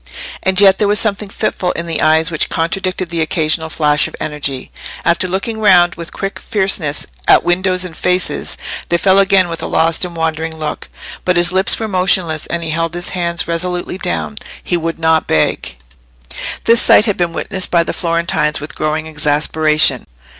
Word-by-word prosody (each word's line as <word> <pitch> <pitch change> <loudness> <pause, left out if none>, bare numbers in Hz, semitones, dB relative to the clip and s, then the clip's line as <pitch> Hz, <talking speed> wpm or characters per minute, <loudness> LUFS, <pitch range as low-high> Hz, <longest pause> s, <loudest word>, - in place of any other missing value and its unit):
And 190 0 +1
yet 195 -1 +6
there 210 - +2
was 205 0 +3
something 210 -1 -1
fitful 195 -3 -2
in 170 - -4
the 165 -1 -2
eyes 160 +1 +3
which 165 - 0
contradicted 185 +2 -2
the 165 -1 -1
occasional 160 0 0
flash 150 -2 +1
of - - -10
energy: 140 -3 -4 0.3
after 170 +2 +2
looking 195 +5 -3
round 180 -5 +5
with 170 0 -8
quick 195 0 -5
fierceness 190 -8 -1 0.2
at - - +6
windows 185 +1 +1
and 170 -3 -9
faces, 180 +3 0 0.3
they 170 - +3
fell 190 +2 +3
again 195 -2 +4
with 165 -1 -5
a - - -3
lost 165 +2 +1
and 175 -1 -3
wandering 160 0 -2
look. 155 -1 -5 0.3
But 180 - +1
his 175 0 +2
lips 190 +1 +1
were 220 - -3
motionless, 180 -5 0
and 170 -1 -3
he 160 - -3
held 165 +1 -2
his 175 0 -2
hands 170 -2 -2
resolutely 180 +2 -3
down. 80 - -3 0.2
He - - -1
would 165 -1 -2
not 160 -1 +2
beg. 75 - 0 0.9
This 230 +1 +5
sight 210 - +6
had 205 -4 0
been 175 -1 -1
witnessed 190 +2 -2
by 170 -1 +3
the - - -4
Florentines 170 -3 0
with 150 +1 -8
growing 155 +1 -2
exasperation. 155 0 +2
170 Hz, 180 wpm, -15 LUFS, 160-185 Hz, 0.9 s, yet